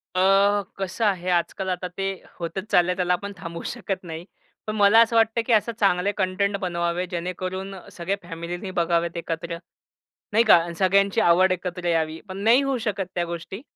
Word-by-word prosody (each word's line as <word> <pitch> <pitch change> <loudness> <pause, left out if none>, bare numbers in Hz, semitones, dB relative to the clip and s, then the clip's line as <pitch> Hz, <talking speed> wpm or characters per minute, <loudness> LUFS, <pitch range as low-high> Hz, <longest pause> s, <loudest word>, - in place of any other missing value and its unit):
अ, - - +1 0.6
कसं 195 +4 -2
आहे 185 -3 0
आजकाल 190 +2 -2
आता 180 0 -4
ते 195 - -1 0.3
होतच 170 +4 -4
चाललंय 180 +1 +3
त्याला 180 -1 +1
आपण 200 +3 -3
थांबवू 170 -3 -7
शकत 195 -6 -4
नाही. 165 0 -7 0.4
पण 215 - -2
मला 205 +1 +6
असं 230 0 -5
वाटतं 225 +1 +3
की 235 - +2
असे 220 +2 +3
चांगले 195 0 +3
कंटेंट 200 +2 0
बनवावे, 170 0 -1
जेणेकरून 185 +2 -4
अ, 190 - -9 0.2
सगळ्या 185 +3 -2
फॅमिलीनी 175 +3 -6
बघावेत 170 0 0
एकत्र, 170 +1 -4 0.8
नाही 225 +2 +4
का, - - +10 0.2
सगळ्यांची 200 +3 +3
आवड 185 +2 +5
एकत्र 180 -1 -4
यावी. 160 0 -1
पण 190 0 -6
नाही 250 +4 +6
होऊ 275 -1 0
शकत 195 -2 -2
त्या 175 - 0
गोष्टी. 190 +6 -7
185 Hz, 175 wpm, -24 LUFS, 170-200 Hz, 0.8 s, का